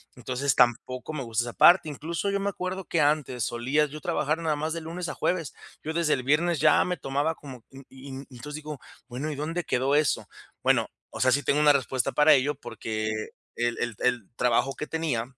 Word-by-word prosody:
Entonces, 130 +2 -1
tampoco 125 +4 +1
me 145 -3 -3
gusta 115 0 -1
esa 120 - -6
parte. 175 -2 +6
Incluso, 165 +7 -3
yo 200 0 0
me 200 +1 0
acuerdo 185 -1 -4
que 165 - +1
antes 145 -5 +1
solía 130 +7 +1
yo 150 +1 -8
trabajar, 150 +2 0
nada 160 -2 0
más 155 +2 -2
de 165 - -4
lunes 170 +2 -5
a - - -3
jueves. 170 -6 -1 0.3
Yo 160 - -3
desde 165 -2 +2
el 130 - -1
viernes 155 +4 +2
ya 155 +1 +5
me 180 0 -2
tomaba 145 +3 -1
como 135 -4 -10
u 135 0 -11
Y 135 +1 -12 0.2
y 130 - -13
entonces, 145 +5 -7
digo: 150 -2 -7 0.3
"Bueno. 135 +5 -4
¿Y - - -4
dónde 165 +5 -3
quedó 135 0 +1
eso?". 150 -3 +1 0.3
Bueno, - - +2 0.2
o - - -9
sea, 130 - +4
sí 140 +3 +3
tengo 145 - +2
una 150 -1 +6
respuesta 130 -3 0
para 150 +1 +6
ello, 140 +1 +2
porque 110 -1 -4 0.5
el 120 0 -1
el 120 -2 -2
el 125 -5 0
trabajo 125 +3 +1
que 150 - -5
tenía, 160 -8 -1
145 Hz, 215 wpm, -27 LUFS, 125-160 Hz, 0.5 s, parte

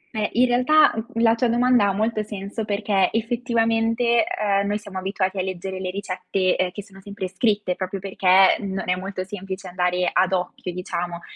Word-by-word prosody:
Eh, 210 -1 0
in 245 +2 +4
realtà, 255 +5 +4
mhmm, 230 +1 -3
la 225 - +5
tua 235 +1 +1
domanda 240 -2 +3
ha - - +2
molto 215 +2 0
senso, 210 +1 -5
perché 200 -2 +1
effettivamente, 230 0 +1
ehm, 200 -1 0
noi 205 - 0
siamo 200 -3 -7
abituati 190 0 -2
a - - +2
leggere 185 0 -5
le 185 - -3
ricette, 185 -1 -1
ehm, 185 - 0
che 205 +2 -8
sono 195 -1 -16
sempre 200 -1 -6
scritte 205 0 0
proprio 190 +1 -4
perché 190 0 +4
non 195 -2 -4
è 180 - +2
molto 185 0 -5
semplice 190 -1 -7
andare 180 0 0
ad 190 - +2
occhio, 180 0 -3
diciamo. 175 -1 -4
200 Hz, 185 wpm, -23 LUFS, 185-225 Hz, -, la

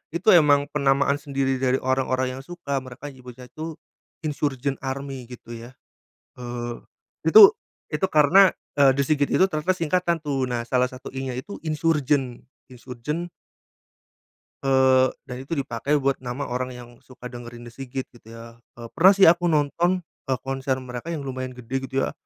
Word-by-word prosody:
itu 170 +4 -5
emang 145 -3 +5
penamaan 140 0 +2
sendiri 135 -2 -1
dari 130 0 +1
orang-orang 130 0 -1
yang - - -8
suka 140 -4 -4
mereka 130 +3 -9
menyebutnya 125 -1 -12
itu 160 +1 -6 0.5
Insurgent 145 -3 -2
Army 135 -1 -5
gitu 120 -1 -10
ya. 115 +2 -10 0.7
Eee 120 -1 -6 0.5
itu 200 +4 +10 0.4
itu 150 +5 +1
karena, 175 +6 +6 0.3
eee, 140 -2 +6
The - - +3
S.I.G.I.T 145 0 +1
itu 190 - +6
ternyata 155 +2 0
singkatan 170 +1 0
tuh. 140 -4 -1
Nah, 120 -1 -1
salah 125 +1 +1
satu 130 0 -10
I 135 - -4
nya - - -5
itu 135 +11 -7
Insurgent. 150 -5 0 0.3
Insurgent. 130 +7 -6 1.3
Eee, 130 -1 +4 0.2
dan 125 -2 -8
itu 135 +6 -4
dipakai 140 0 -1
buat 140 -2 0
nama 125 +2 -5
orang 125 -1 -4
yang 120 -1 -11
suka 125 -1 -12
dengerin 120 -1 -9
The 120 - -11
S.I.G.I.T 130 +1 -6
gitu - - -24
ya, 115 0 -12 0.3
pernah 190 +4 +6
sih 195 - +3
aku 175 0 +6
nonton, 170 +4 +1 0.2
eee, 135 - +1
konser 135 0 -1
mereka 125 +3 -7
yang 145 - -5
lumayan 130 -1 -5
gede 130 +2 -4
gitu 135 +1 -1
ya. - - -2
135 Hz, 160 wpm, -24 LUFS, 125-150 Hz, 1.3 s, itu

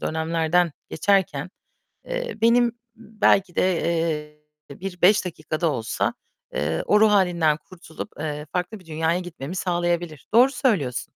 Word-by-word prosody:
dönemlerden 165 +1 +1 0.2
geçerken, 180 -3 +1 0.6
eee, - - -4
benim, 235 +1 +4 0.2
belki 210 -4 +1
de, 185 -1 +3 1.0
eee, 140 - -10
bir 180 -2 -6
5 200 +2 +5
dakika 155 -2 -5
da 165 -3 +2
olsa, 115 -4 -1 0.4
eee, 80 +2 -1
o 210 - +4
ruh 220 0 +6
hâlinden 175 -6 +3
kurtulup, 165 -1 -10
eee, 150 -1 -4
farklı 180 +3 -3
bir 175 - -20
dünyaya 160 +2 0
gitmemi 175 -1 -7
sağlayabilir. 175 -4 -1
Doğru 255 +4 +6
söylüyorsun. 165 - 0
175 Hz, 135 wpm, -24 LUFS, 155-200 Hz, 1.0 s, ruh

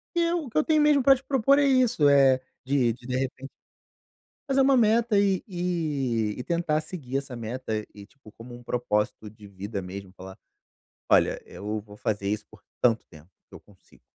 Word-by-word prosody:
que 345 - +2
eu 335 -2 0
o - - -9
que - - -4
eu 310 - +4
tenho 310 -1 +2
mesmo 295 -2 +4
pra 270 +1 +7
te 270 - -11
propor 275 +1 +3
é 285 - +3
isso, 250 - +3
eh, 135 -2 +5 0.3
de 130 -4 +2
de 120 - -17
de 125 0 -1
repen 135 0 -4 1.0
fazer 270 0 +2
uma 270 0 +4
meta 225 -2 +3
e 195 -2 +2
e 150 - -2
e 125 - -5
tentar 165 -3 0
seguir 145 -5 -5
essa 135 -3 -6
meta, 110 -2 -4
e 100 -1 -11
tipo, 135 -1 -19
como 120 +2 -12
um 120 - -10
propósito 105 -3 -2
de 105 -1 -15
vida 100 +1 -6
mesmo 95 +1 -8
falar: 95 0 -12 0.7
"Olha, - - +3
eu 105 +2 -5
vou 105 0 -15
fazer 100 -2 -2
isso 105 +1 -2
por 110 -1 -17 0.2
tanto 115 -2 +2
tempo 80 +2 -17 0.2
que - - -17
eu - - -11
consigo 100 -3 -24
130 Hz, 200 wpm, -26 LUFS, -, 1.0 s, pra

